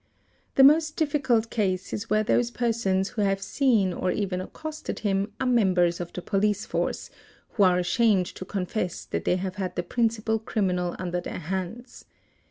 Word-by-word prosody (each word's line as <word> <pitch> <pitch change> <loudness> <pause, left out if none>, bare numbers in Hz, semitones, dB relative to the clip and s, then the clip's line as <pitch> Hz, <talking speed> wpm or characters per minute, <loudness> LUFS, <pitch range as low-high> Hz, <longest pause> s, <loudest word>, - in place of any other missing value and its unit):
The 270 - +7
most 310 +2 +5
difficult 270 -8 +1
case 190 -4 -1
is 210 +2 -4
where 215 0 +3
those 240 +2 +2
persons 225 -6 0
who 215 - -3
have 195 -1 +1
seen 215 -5 +2
or 185 - -1
even 185 -2 -1
accosted 310 +10 -6
him 200 -1 0
are 260 - -1
members 185 -8 +3
of 175 -1 -5
the 180 - -7
police 205 0 0
force, - - -2 0.4
who 210 - -2
are 180 -2 +5
ashamed 190 +1 +2
to 185 - -8
confess 185 -1 -3
that - - -4
they - - +3
have 185 +1 -4
had 185 -2 -3
the 175 - -1
principal 225 +2 0
criminal 180 -5 -1
under 180 -1 -3
their - - -6
hands. 190 - -5
200 Hz, 175 wpm, -26 LUFS, 185-230 Hz, 0.4 s, The